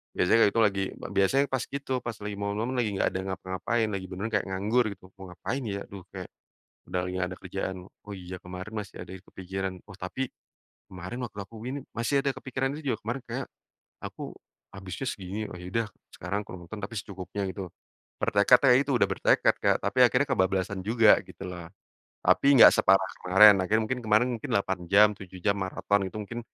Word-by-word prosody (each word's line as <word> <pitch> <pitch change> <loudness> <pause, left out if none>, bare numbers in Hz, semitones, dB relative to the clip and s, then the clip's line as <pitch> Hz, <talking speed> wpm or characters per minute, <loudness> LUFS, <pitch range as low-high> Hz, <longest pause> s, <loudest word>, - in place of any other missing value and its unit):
biasanya 90 +6 +4
kayak - - +4
gitu 115 - +4
lagi 100 -2 +2
b - - -16 0.2
biasanya 135 +9 +4
pas 130 -1 0
itu 140 -1 -6
pas 120 - -2
lagi 105 -1 -4
momen-momen 105 +5 -2
lagi 115 -3 +1
gak - - +2
ada 95 - -3
ngapa-ngapain, 95 +5 -1
lagi 95 -1 -3
beneran 95 +5 -5
kayak 105 -3 +1
nganggur 105 +6 +1
gitu 95 - -37 0.2
mau 95 - -8
ngapain 125 +10 -4
ya, 100 -1 -3
duh 100 -2 -9
kayak - - -7 0.6
udah 90 - 0
lagi 90 - -4
nggak 90 -1 -1
ada 95 - -7
kerjaan, 95 0 -4
oh, 100 +1 -12
iya, 90 0 -8
kemarin 90 +3 -8
masih 100 - -10
ada - - -13
yang 95 - -11
kepikiran, 95 0 -4
oh, 100 - -12
tapi 95 +9 -4 0.6
kemarin 95 +6 -7
waktu 105 - -14
aku 105 +4 -15
gini 135 +3 -3
masih 115 +4 -2
ada 140 - +1
kepikiran 135 0 -2
itu - - -7
juga 110 - -3
kemarin 120 +4 -3
kayak 125 +3 -4 0.6
aku - - -7 0.4
habisnya 95 +6 -6
segini, 100 +2 -5
oh, - - -8
ya 90 0 -9
udah 115 -1 +1 0.3
sekarang 105 +1 -4
kalau 90 -3 -10
nonton 110 - -7
tapi 105 - -8
secukupnya 95 0 -5
gitu, 95 -1 -6 0.5
bertekad 105 +5 +5
ya 125 - +8
itu 140 +1 -2
udah 110 - +4
bertekad 95 - +3
kayak - - +4
tapi - - -1
akhirnya 125 +3 +4
kebablasan 95 -2 0
juga 110 0 +5
gitu - - -11
loh. 85 -2 -8 0.6
Tapi 140 - +4
nggak - - +10
separah 95 0 +3
kemarin, 100 +3 +8
akhirnya 105 +4 +2
mungkin 130 +3 -2
kemarin 110 +3 +4
mungkin - - -7
8 95 -2 0
jam, 105 +1 +8
7 95 -1 -11
jam 100 - +3
maraton 95 +1 0
itu 95 - -11
mungkin 115 +3 -6
100 Hz, 200 wpm, -28 LUFS, 95-115 Hz, 0.6 s, nggak